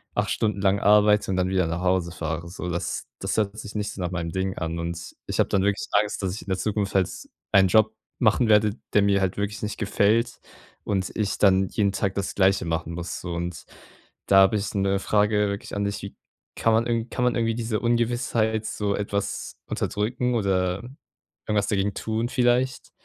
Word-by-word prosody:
8 - - 0
Stunden 105 -3 0
lang 100 0 +3
arbeite 105 -1 +4
und 95 - 0
dann 95 0 +1
wieder 95 -3 +1
nach 85 +2 -3
Hause 90 -2 +1
fahre, 80 +1 -4
so. 90 0 -5
Das 85 0 -3
das - - -1
hört 105 -1 0
sich 105 -1 -8
nicht 105 -1 -2
so 95 - -7
nach 90 -1 -2
meinem 85 -2 -3
Ding 95 +1 -2
an. 80 0 -3
Und 85 0 -5
ich - - -3
habe - - +3
dann 100 - +2
wirklich 100 0 0
Angst, 105 0 +1
dass 95 -1 -1
ich - - -8
in - - -22
der 95 - 0
Zukunft 100 0 -2
halt 95 -2 +3 0.4
einen 95 -1 +6
Job 110 +2 +4 0.3
machen 115 +1 +3
werde, 105 0 +5 0.2
der 105 - +5
mir 100 -1 +3
halt 95 -2 0
wirklich 100 +1 -3
nicht 105 0 -3
gefällt 105 +3 +1 0.5
und 95 -3 -1
ich 105 -2 -1
dann 95 -1 +4
jeden 100 -3 +1
Tag 100 -1 -1
das 100 -1 -2
Gleiche 95 -1 +3
machen 80 0 -2
muss. 85 -1 -5
So 85 -1 -5
und 85 -1 -4 0.6
da 95 - +5
habe 95 +3 +4
ich 100 - -2
'ne 100 0 +1
Frage 105 0 +2
wirklich 100 0 -5
an 100 - -1
dich, 100 - -3
wie 100 - -7 0.4
kann 115 - +2
man 115 +1 +2
irgend 115 0 -1
kann 125 - -1
man 125 - +2
irgendwie 115 -1 +1
diese 115 -2 -2
Ungewissheit 115 -2 +1
so 100 -2 -1
etwas 100 -1 -3
unterdrücken 125 +4 -1
oder 95 -2 0 0.6
irgendwas 105 -1 +1
dagegen 100 -1 0
tun 115 +2 -2
vielleicht? 125 +1 +1
100 Hz, 205 wpm, -25 LUFS, 95-110 Hz, 0.6 s, einen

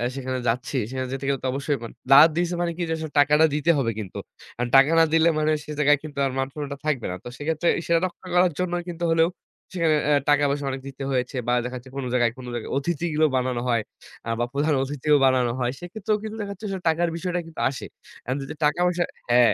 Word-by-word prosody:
সেখানে 130 -1 -3
যাচ্ছি। 125 +4 -1
সেখানে 130 0 -3
যেতে 135 0 -4
গেলে 140 -1 0
তো - - 0
অবশ্যই 140 +1 -1 0.3
দাওয়াত 145 +4 +9
দিয়েছে 175 +1 0
মানে 170 -1 0
কি - - -4
যে - - +1
আসলে 160 -1 -6
টাকাটা 150 +2 +5
দিতে 150 +3 +3
হবে 120 -5 +1
কিন্তু। 100 -4 -7 0.4
আর 125 - +1
টাকা 135 +3 +7
না - - +7
দিলে 165 0 +5
মানে 155 0 +2
সে 150 - -8
জায়গায় 145 0 +5
কিন্তু 150 -3 -9 0.2
মান 135 - 0
সন্মানটা 145 -2 -5
থাকবে 145 -6 0
না। - - -4
তো - - -9
সেক্ষেত্রে 160 +3 -1
বিষয়টা 170 0 +1
রক্ষা 180 0 -7
সেটা - - -7
করার 180 0 +5
জন্যও 175 -1 -1
কিন্তু 175 0 -6
হলেও 165 +1 +3 0.5
সেখানে 165 -3 +2
আ 150 - +5 0.2
টাকা-পয়সা 145 -1 +2 0.2
দিতে 135 0 -8
হয়েছে 125 0 -1
বা 120 - +2
দেখাচ্ছে 125 +1 -7
কোন 140 - -3
জায়গায় 120 -2 +3
কোন 130 - -9
জায়গায় 120 - -5
অতিথিও 155 +1 0
বানানো 125 -1 -1
হয়, 115 -2 +2 0.5
আ - - -2
বা 120 - +1
প্রধান 150 +2 +1
অতিথিও 145 +2 +1
বানানো 130 -2 +3
হয়। 125 -1 0
সেক্ষেত্রেও 205 +4 -2
কিন্তু 220 0 -5
দেখাচ্ছে 200 0 -7
আসলে 190 -1 -4
টাকার 170 +2 +1
বিষয়টা 180 +1 -2
কিন্তু 165 - -7
আসে। 135 - -6 0.4
এখন 125 - -1
যদি 135 - -7
টাকা-পয়সা 175 +4 +2 0.3
হ্যা, 120 - +6
145 Hz, 215 wpm, -24 LUFS, 130-170 Hz, 0.5 s, দাওয়াত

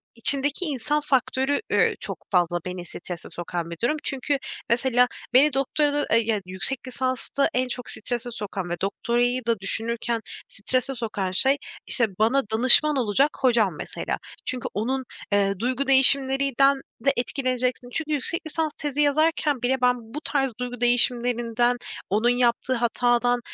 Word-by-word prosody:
içindeki 280 +8 +3
insan 295 +1 -1
faktörü, 270 - 0
eee, - - +3
çok - - -6
fazla 175 -1 +2
beni 180 -1 -5
strese 175 +1 -7
sokan 175 -1 -5
bir 170 - -7
durum. 305 +6 +2
Çünkü 275 +1 -1 0.3
mesela 245 +1 +3 0.3
beni 280 +2 +5
doktorada 290 +2 +1
ey 230 0 +3
ya, 215 -3 0
yüksek 215 +9 -2
lisansta 260 +2 -1
en 255 0 +1
çok 250 -1 -3
strese 240 +1 -2
sokan 200 -5 -5
ve 175 - -1
doktorayı 240 +5 0
da 230 -4 +1
düşünürken 230 +3 0 0.3
strese 255 +5 -1
sokan 205 -5 -3
şey, 270 +9 +2 0.3
işte, 235 -3 +4
bana 255 +6 +3
danışman 255 +6 +5
olacak 260 +5 +2
hocam 230 - +3
mesela. - - -4 0.3
Çünkü 255 -1 -3
onun, 260 +6 -1 0.3
eee, 200 -1 +2
duygu 255 +3 -1
değişimlerinden 270 0 +3 0.2
de 275 - +5
etkileneceksin. 255 -1 -1
Çünkü 310 -1 -2
yüksek 295 +3 -2
lisans 315 0 -2
tezi 295 0 -2
yazarken 295 -2 +2
bile 255 +1 0
ben 250 0 +4 0.2
bu 300 - -4
tarz 270 -2 0
duygu 245 -1 -5
değişimlerinden, 240 0 +2 0.3
onun 220 +5 +2
yaptığı 245 +1 +1
hatadan, 240 0 +1
250 Hz, 145 wpm, -24 LUFS, 230-275 Hz, 0.3 s, beni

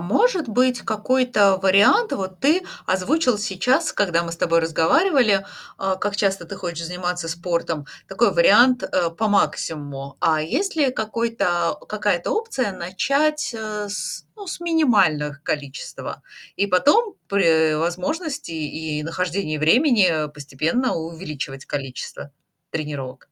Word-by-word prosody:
может 330 - +1
быть 250 +2 +2
какой-то 215 -3 +2
вариант 205 - +5
вот 190 -1 -4
ты 315 +7 +3 0.2
озвучил 240 - +1
сейчас, 210 +5 +1
когда 170 -4 +1
мы 170 -1 -5
с - - -6
тобой 165 0 +2
разговаривали, 200 - +3 0.3
а, 190 -1 -1
как 205 +1 -2
часто 195 -3 0
ты 165 - -8
хочешь 170 -2 -5
заниматься 180 -1 -3
спортом, 170 -3 -2 0.2
такой - - +2
вариант, 255 - +5
э, 170 -2 0
по 215 +6 -1
максимуму, 145 -8 -1
а 155 -1 +2
есть 370 - -2
ли 280 -4 +3
какой-то 220 -5 -1
какая-то - - -1
опция 435 - -1
начать, 275 - 0
э, 215 -1 -4
с 200 - -5
ну, 405 -2 -10
с 345 - -6
минимальных 195 - +2
количес 145 -2 -4
тва - - -7 0.3
и 200 - +1
потом 290 - +3
при 160 -5 +3
возможности 180 - -3
и 155 0 -4
и - - -5
нахождении 165 0 -2
времени 180 - +3
постепенно 155 - -1
увеличивать 160 -5 -6
количество 135 0 -6 0.4
тренировок? 145 -4 -5
190 Hz, 130 wpm, -22 LUFS, 160-250 Hz, 0.4 s, вариант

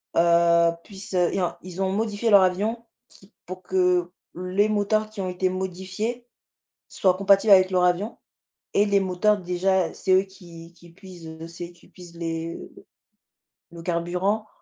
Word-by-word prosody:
heu 170 0 +4
puissent, 195 -1 -9
heu 180 -1 +2
et 195 - -1
en 180 - -2
ils 185 +1 -7
ont 190 0 0
modifié 215 +2 -1
leur 200 -3 +7
avion 215 +6 -1 0.2
qui 195 - -21
pour 185 +1 -8
que 180 -1 +1 0.2
les 185 +4 0
moteurs 215 +1 0
qui 215 -2 -7
ont 185 - -3
été 180 +1 -1
modifiés 190 +6 -4 0.6
soient 185 -2 +1
compatibles 200 +2 +4
avec 185 -1 +6
leur 180 -1 +2
avion 180 +6 0 0.6
et 205 - +4
les 200 -1 +2
moteurs 195 +3 +1
déjà, 180 0 0
c'est 190 - -2
eux 185 - +6
qui 170 -3 -14
qui 170 0 -18
puisent 165 -3 -11
c'est 170 +1 -8
qui 175 - -22
puisent 175 -2 -14
les, 165 0 -4
heu - - -14 0.9
le 170 -1 -10
carburant 180 +5 -1
185 Hz, 165 wpm, -24 LUFS, 175-200 Hz, 0.9 s, leur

